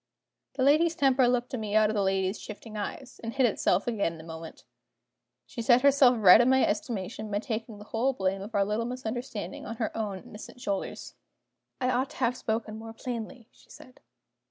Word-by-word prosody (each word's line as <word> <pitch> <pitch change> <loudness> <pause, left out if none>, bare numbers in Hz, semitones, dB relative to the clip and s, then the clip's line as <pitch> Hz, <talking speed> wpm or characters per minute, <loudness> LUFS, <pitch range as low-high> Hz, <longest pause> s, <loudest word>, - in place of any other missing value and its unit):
The 260 - 0
lady's 320 +4 +4
temper 265 -2 +4
looked 245 0 0
at 255 - -2
me 210 -1 -3
out 215 0 +5
of - - -3
the 205 - +2
lady's 190 +1 0
shifting 215 +1 -9
eyes, 225 +5 -6
and 230 0 -4
hid 265 -2 +4
itself 200 -4 +1
again 210 -8 0
in 165 - -11
a - - -13
moment. 160 0 -9 0.8
She 130 - -6
set 240 +2 +4
herself 275 -3 +6
right 210 0 +8
in 245 - +3
my 265 0 +4
estimation 210 -1 -3
by 205 - -1
taking 220 0 -4
the 205 - -10
whole 240 +5 0
blame 190 -3 -1
of 210 +3 -7
our 200 -1 +3
little 210 +3 -1
misunderstanding 240 -5 -5
on 230 - -5
her 220 -2 -3
own 210 -3 -3
innocent 210 +3 -11
shoulders. 200 -6 -4 0.7
"I 255 -1 +1
ought 255 +2 0
to - - -13
have 250 -1 +1
spoken 220 -2 -3
more 225 0 -9
plainly," 235 0 -6
she - - -24
said. 255 - -15
225 Hz, 205 wpm, -28 LUFS, 205-250 Hz, 0.8 s, right